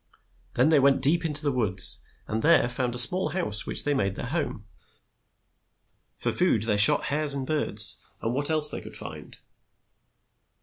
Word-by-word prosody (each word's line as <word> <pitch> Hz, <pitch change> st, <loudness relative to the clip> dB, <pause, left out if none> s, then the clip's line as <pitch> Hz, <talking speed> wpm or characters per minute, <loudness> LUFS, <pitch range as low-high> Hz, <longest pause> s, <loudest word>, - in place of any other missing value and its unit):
Then 130 Hz, +5 st, +1 dB
they 155 Hz, -2 st, +2 dB
went 135 Hz, 0 st, +1 dB
deep 165 Hz, +5 st, 0 dB
in 155 Hz, -, -4 dB
the 145 Hz, 0 st, +1 dB
woods, 100 Hz, -8 st, -1 dB, 0.2 s
and 110 Hz, +1 st, -5 dB
there 155 Hz, -4 st, +2 dB
found 125 Hz, 0 st, -5 dB
a -, -, -6 dB
small 180 Hz, +10 st, +7 dB
house 135 Hz, -, -5 dB
which -, -, +1 dB
they 145 Hz, -, -2 dB
made 100 Hz, -7 st, -3 dB
their -, -, -8 dB
home. 135 Hz, -7 st, -6 dB, 1.5 s
For -, -, -4 dB
food 175 Hz, -, -1 dB
they 105 Hz, -2 st, -2 dB
shot 105 Hz, -, +7 dB
hares 150 Hz, -1 st, +4 dB
and 135 Hz, -1 st, -5 dB
birds 130 Hz, -8 st, -4 dB, 0.2 s
and 115 Hz, -, -5 dB
what 145 Hz, +3 st, -4 dB
else 155 Hz, -1 st, +3 dB
they -, -, -7 dB
could -, -, -13 dB
find. -, -, -12 dB
135 Hz, 175 wpm, -23 LUFS, 110-155 Hz, 1.5 s, small